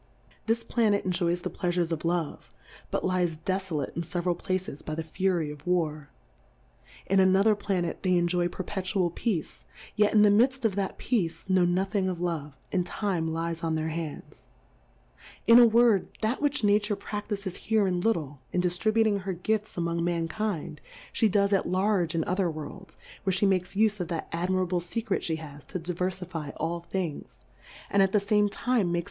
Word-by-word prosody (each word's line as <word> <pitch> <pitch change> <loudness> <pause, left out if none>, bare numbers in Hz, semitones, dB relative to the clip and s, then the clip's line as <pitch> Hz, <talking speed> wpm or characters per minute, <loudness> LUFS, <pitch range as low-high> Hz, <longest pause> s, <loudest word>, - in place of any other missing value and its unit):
This 230 +1 +1
Planet 215 -4 +1
enjoys 175 -1 0
the - - -4
Pleafures 175 -1 -1
of 160 -2 -2
Love, 170 -2 -2 0.4
but - - -1
lies 180 -3 +1
defolate 185 -4 -2
in 170 - -1
feveral 175 +1 -1
Pla 185 +2 -1
ces 180 -6 -7
by 155 - -5
the 160 - -3
Fury 170 -1 0
of 150 +2 -12
War; 155 -5 0 1.0
in 195 +1 +3
another 190 +3 +5
Pla 200 -3 -1
net 170 -1 -3
they 185 -2 +2
enjoy 175 0 +2
perpetual 185 0 -2
Peace, 180 -4 -3 0.3
yet 210 -1 +4
in 210 -1 +6
the 205 - +6
midft 250 +4 +3
of 215 - +3
that 195 0 -2
Peace, 185 -6 -1
know 185 -1 +4
nothing 190 +2 +1
of 180 -2 -4
Love, 160 -5 -3 0.2
and 185 -2 +1
Time 175 -3 -2
lies 165 +1 -3
on 160 -1 0
their 160 0 -1
Hands; 160 -1 -6 1.0
in 230 +2 +8
a 240 - +9
Word, 230 -3 +4 0.2
that 225 +6 0
which 290 -4 +1
Nature 205 +1 +3
praftifes 205 -2 -4
here 220 -2 +1
in 180 -2 0
little, 155 -10 -1
in 180 - 0
diftributing 205 +4 +2
her 190 0 -3
Gifts 215 +4 -2
^mong 170 -1 -1
Mankind; 170 -1 -2 0.3
fbe 220 - +3
does 200 +1 +2
at 195 - +1
large 185 -3 +1
in 165 - +1
other 185 +1 0
Worlds, 160 +5 -8 0.3
w^iere 190 - +1
fhe 205 - +4
makes 185 -1 0
ufe 210 0 +2
of 180 - -2
that 165 -1 -4
admirable 180 +1 0
Secret 195 +4 -2
fhe 160 -1 -1
has 145 -2 -10
to 185 - -5
diver 180 +1 -2
fifie 180 -5 -6
all 170 +2 -2
Things, 170 - -5 0.5
and 200 - +4
at 195 -1 +3
the 210 - +5
fame 205 +1 +2
Time - - -17
makes - - -10
Plurality 225 -9 +2
^WORLDS. 175 - +2
185 Hz, 185 wpm, -28 LUFS, 170-205 Hz, 1.0 s, a